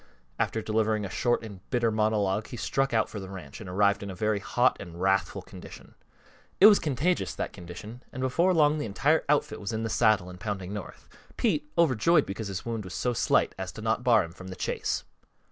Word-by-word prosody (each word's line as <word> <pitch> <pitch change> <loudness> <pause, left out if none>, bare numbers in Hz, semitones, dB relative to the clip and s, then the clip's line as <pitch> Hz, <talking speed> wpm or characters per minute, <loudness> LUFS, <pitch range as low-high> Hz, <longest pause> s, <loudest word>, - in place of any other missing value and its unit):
After 110 - 0
delivering 110 -1 0
a 95 - -6
short 120 -2 +1
and 100 -4 -9
bitter 120 -3 +1
monologue 105 -1 +1
he 120 - -8
struck 135 +3 0
out 115 -1 +2
for 105 - -7
the 95 -1 -8
ranch 90 -6 -9
and 95 - -8
arrived 100 +2 +2
in 100 - -6
a 95 - -6
very 105 +2 0
hot 120 +5 +2
and 85 0 -9
wrathful 95 -1 +1
condition. - - -12 0.7
It 195 - +8
was 210 -1 +9
contagious, 155 +4 0
that - - -4
condition, 100 +7 -9
and 130 - -8
before 130 +8 +2
long 155 -3 +3
the 145 - -2
entire 145 +10 +2
outfit 150 -6 +1
was 100 - -3
in 110 0 -2
the 115 - -2
saddle 110 -5 +3
and 90 0 -10
pounding 95 -2 -4
north, 105 -2 -8 0.3
Pete 150 -10 0
overjoyed 165 +1 +4
because 100 +2 -5
his 95 -2 -5
wound 115 -2 -3
was 95 -1 -8
so 125 - 0
slight - - +2
as 95 +1 -6
not 110 +1 0
to - - -16
bar 120 -3 +4
him 85 - -8
from 95 +1 -11
the 95 - -7
chase. - - -2
110 Hz, 215 wpm, -28 LUFS, 95-125 Hz, 0.7 s, was